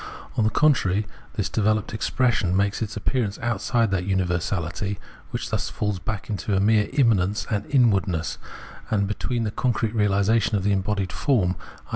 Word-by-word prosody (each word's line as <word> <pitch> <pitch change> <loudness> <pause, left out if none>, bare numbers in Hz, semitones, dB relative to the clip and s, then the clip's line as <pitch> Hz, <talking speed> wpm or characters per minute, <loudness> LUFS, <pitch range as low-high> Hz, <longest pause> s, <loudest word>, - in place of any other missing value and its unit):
On 110 - +2
the 110 - +3
contrary, 110 -7 +2 0.3
this 105 -5 0
developed 110 -1 0
expression 110 -5 +1
makes 100 +2 0
its 110 -1 -3
appearance 105 -1 -1
outside 115 -1 0
that 95 -2 0
universality, 95 0 -1 0.3
which - - -4
thus - - -1
falls 105 -3 -2
back 105 +3 -4
into 100 -2 -1
mere 105 +1 +3
immanence 105 -7 +2
and 105 -1 -1
inwardness; 100 - +2 0.5
and 100 -2 +1
between 115 +3 -2
the 105 - -1
concrete 115 -2 0
reahsation, 105 0 +2
the 100 - +2
embodied 95 -1 0
form, 100 -10 +1 0.3
i. - - -23
105 Hz, 150 wpm, -24 LUFS, 95-110 Hz, 0.5 s, the